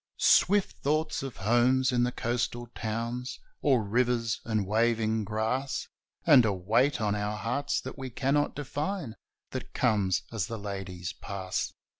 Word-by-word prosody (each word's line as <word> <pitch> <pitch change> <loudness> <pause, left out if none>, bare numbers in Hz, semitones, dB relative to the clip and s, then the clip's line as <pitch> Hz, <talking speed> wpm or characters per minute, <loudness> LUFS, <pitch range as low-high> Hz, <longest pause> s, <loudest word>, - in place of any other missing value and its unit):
Swift 200 +1 +4
thoughts 155 +2 0
of 135 -3 -6
homes 125 +5 +3
in 120 -1 +2
the 125 - +1
coastal 120 0 -2
towns 115 +3 -3 0.2
Or 130 -6 +3
rivers 120 +1 +1
and 110 -3 0
waving 110 +1 +1
grass 115 +6 -1 0.4
And 145 -6 +8
a 110 - +2
weight 110 +10 +2
on 105 -2 +1
our 105 0 -2
hearts 125 +6 -1
that - - -8
we 130 -1 -4
cannot 140 +4 +1
define 145 - -3 0.4
That - - -6
comes 95 -4 +2
as 110 -6 -1
the 115 - -4
ladies 95 -4 -5
pass. 95 -2 -3
115 Hz, 145 wpm, -29 LUFS, 105-130 Hz, 0.4 s, And